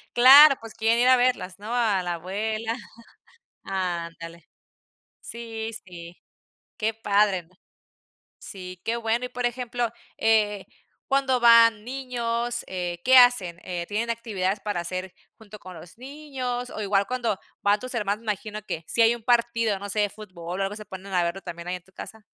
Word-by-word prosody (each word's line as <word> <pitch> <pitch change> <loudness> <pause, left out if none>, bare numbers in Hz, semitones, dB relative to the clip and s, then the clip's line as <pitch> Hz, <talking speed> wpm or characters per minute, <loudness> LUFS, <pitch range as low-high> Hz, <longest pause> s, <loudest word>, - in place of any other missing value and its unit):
Claro, 275 +4 +9
pues, 225 -1 -10
quieren 225 +1 +1
ir 245 - +4
a 255 - +7
verlas, 245 -7 0
¿no?, 215 +3 -6
a 220 -6 +1
la 175 -1 -2
abuela 215 +6 -3 0.9
ándale. 170 -3 -5 0.7
Sí, 225 -1 -6
sí. 175 -2 -11 0.6
Qué 220 +1 -1
padre 205 -3 +1
,¿no? 175 +3 -28 0.8
Sí, 185 -2 -10
qué 230 - -1
bueno, 230 +1 -1
y - - -3
por 245 0 -2
ejemplo, 240 0 -2 0.3
eh, 210 -3 +2 0.4
cuando 270 -2 +2
van 230 -2 +6
niños, 240 -2 -3
eh, 175 -2 -4
¿qué 260 0 +6
hacen? 245 -9 +5
Eh, 175 -2 -4
¿tienen 225 +3 -2
actividades 210 -4 -2
para 205 -4 -3
hacer 185 +1 -5 0.2
junto 215 -2 -13
con 185 -2 -11
los 170 +5 -13
niños?, 255 -3 -5
o - - -7
igual 200 -1 +1
cuando 235 -5 -2 0.2
van 205 +1 +3
tus 255 0 -7
hermanos 205 +1 -1
me 220 -2 -1
imagino 210 +1 -7
que 165 -5 -6
si 235 - +2
hay 230 +1 +5
un 240 - -10
partido, 230 -3 +1
no 200 +1 -7
sé, 205 +1 +1
fútbol, 185 -4 -8
o - - +1
algo, 195 +2 -3
¿se 215 - -8
ponen 190 0 -10
a 180 - +3
verlo 170 +3 -3
también 170 +1 -8
ahí 180 - -2
en 180 - -13
tu 190 - -25
casa? 220 +3 -10
215 Hz, 175 wpm, -25 LUFS, 185-235 Hz, 0.9 s, Claro